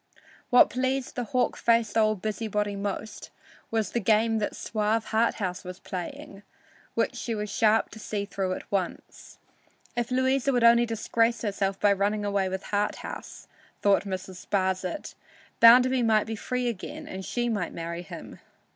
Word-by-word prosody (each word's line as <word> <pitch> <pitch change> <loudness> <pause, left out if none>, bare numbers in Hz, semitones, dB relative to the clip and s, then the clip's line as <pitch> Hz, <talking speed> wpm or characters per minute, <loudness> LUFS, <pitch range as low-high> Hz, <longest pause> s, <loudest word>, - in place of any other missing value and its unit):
What 250 - +6
pleased 260 +1 -1
the 245 - -3
hawk 250 +3 0
faced 230 -2 +2
old 215 -3 +2
busybody 210 -1 -2
most 200 +2 -5 0.4
was 220 -4 -1
the 235 - 0
game 220 +1 +2
the 205 - 0
suave 215 0 -1
Harthouse 220 -5 0
was 180 0 -7
playing, 185 +2 -7 0.5
which - - +1
she 230 - -3
was 210 -1 -4
sharp 220 +1 +3
enough - - -30
to 220 - -10
see 205 -1 -3
through 190 -2 -2
at - - -8
once. 190 -3 -4 0.6
If 240 -1 -1
Louisa 260 +1 +2
would 245 -1 +2
only 235 0 +6
disgrace 230 +1 0
herself 195 -2 -1
by 205 -1 +4
running 205 +1 0
away 200 -2 0
with 190 +1 -4
Harthouse, 205 0 -3 0.4
thought 200 0 +4
Mrs. 190 -1 -6
Sparsit, 190 +6 -1 0.5
Bounderby 250 +2 +7
might 220 -2 +3
be 225 - -4
free 250 +3 -2
again 230 -6 -5
and 190 0 -6
she 240 +4 -2
might 205 -7 -1
marry 170 +1 -5
him. 175 - -10
215 Hz, 160 wpm, -27 LUFS, 195-235 Hz, 0.6 s, Bounderby